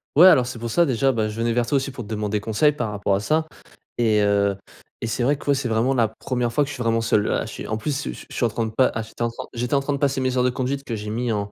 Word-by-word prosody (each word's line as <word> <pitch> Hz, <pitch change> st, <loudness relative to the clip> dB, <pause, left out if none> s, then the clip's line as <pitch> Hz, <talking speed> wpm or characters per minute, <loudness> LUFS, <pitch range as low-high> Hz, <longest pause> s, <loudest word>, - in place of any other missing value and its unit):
Ouais 170 Hz, +5 st, +8 dB
alors, 130 Hz, -9 st, +6 dB
c'est 125 Hz, -, -6 dB
pour 115 Hz, 0 st, -4 dB
ça 170 Hz, -1 st, +4 dB
déjà, 135 Hz, +2 st, +2 dB
bah 110 Hz, -3 st, -1 dB
je 105 Hz, -, -7 dB
venais 115 Hz, 0 st, +1 dB
vers 120 Hz, -1 st, +1 dB
toi 145 Hz, -, 0 dB
aussi 135 Hz, 0 st, 0 dB
pour 125 Hz, -2 st, -7 dB
te 100 Hz, -, -12 dB
demander 105 Hz, -1 st, -1 dB
conseil 115 Hz, +8 st, +2 dB
par 140 Hz, -7 st, -3 dB
rapport 100 Hz, -1 st, -1 dB
à -, -, 0 dB
ça 155 Hz, +8 st, 0 dB, 0.5 s
et 110 Hz, -3 st, +3 dB
heu, 100 Hz, -1 st, +2 dB, 0.5 s
et 115 Hz, -, -2 dB
c'est 115 Hz, -, -2 dB
vrai 140 Hz, +3 st, +2 dB
que -, -, -14 dB
ouais, -, -, +6 dB
c'est 135 Hz, -2 st, -2 dB
vraiment 115 Hz, +4 st, +2 dB
la 115 Hz, -4 st, +3 dB
1re 120 Hz, +2 st, -3 dB
fois 145 Hz, -, +3 dB
que 140 Hz, -, -5 dB
je -, -, -5 dB
suis 125 Hz, -, -6 dB
vraiment 115 Hz, 0 st, +1 dB
seul, 110 Hz, -2 st, +2 dB
là. -, -, 0 dB
Je -, -, -8 dB
suis -, -, -7 dB
en 110 Hz, -, -2 dB
plus, 145 Hz, +6 st, -2 dB
je 65 Hz, -, -3 dB
suis -, -, -12 dB
je -, -, -8 dB
suis -, -, +1 dB
en -, -, +2 dB
train 115 Hz, +1 st, -2 dB
de 110 Hz, -, -4 dB
pas, 130 Hz, +3 st, +3 dB
ah 110 Hz, -, -1 dB
j'étais 110 Hz, +2 st, -12 dB
en 120 Hz, -, +1 dB
train 115 Hz, -, -7 dB
j'étais 120 Hz, +3 st, -3 dB
en 140 Hz, -, +3 dB
train 145 Hz, +1 st, -2 dB
de 140 Hz, -, -2 dB
passer 140 Hz, -2 st, +1 dB
mes 130 Hz, 0 st, 0 dB
heures 125 Hz, -, +3 dB
de 125 Hz, -, +3 dB
conduite 135 Hz, +2 st, -2 dB
que 115 Hz, -, -3 dB
j'ai 105 Hz, 0 st, -6 dB
mis 120 Hz, +1 st, -1 dB
en, 100 Hz, -1 st, -2 dB
120 Hz, 350 wpm, -23 LUFS, 110-135 Hz, 0.5 s, Ouais